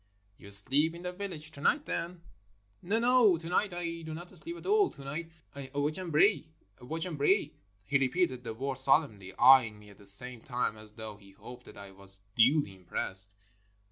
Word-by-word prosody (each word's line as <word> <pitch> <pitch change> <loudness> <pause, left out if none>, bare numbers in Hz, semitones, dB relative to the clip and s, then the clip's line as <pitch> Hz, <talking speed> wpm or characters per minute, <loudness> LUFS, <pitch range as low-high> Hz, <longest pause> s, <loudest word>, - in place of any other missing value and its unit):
"You 100 - -13
sleep 135 +11 +4
in 170 - -10
the 180 - -4
village 180 -5 -4
to 140 - -11
night, 295 - +1
then?" 170 0 -5 0.6
"No, 200 +6 -1
no, 235 -5 +4
to 165 0 -9
night 200 +2 0
I 170 -1 -5
do 160 -1 -7
not 175 +2 -11
sleep 340 +1 -5
at - - -13
all. 410 0 +3
To 140 - -13
night 155 +5 -6 0.3
I 140 -2 -8
watch 150 +4 -1
and 180 -3 -6
pray. 200 +6 +3 0.3
Watch 160 +7 -4
and 165 -5 -6
pray." 150 0 +2 0.3
He 140 +7 +1
repeated 130 -1 0
the 115 -2 -6
words 135 +2 -2
solemnly, 120 -9 +2
eyeing 125 -4 +6
me 105 0 -16
at 100 - -19
the 100 - -5
same 120 +4 +1
time 125 -3 -2
as 110 0 -14
though 110 -1 -7
he 100 -1 -19
hoped 125 +5 -13
that - - -13
I 100 -1 -11
was 95 0 -7
duly 130 -1 +3
impressed. 95 +2 +1
140 Hz, 205 wpm, -30 LUFS, 110-170 Hz, 0.6 s, eyeing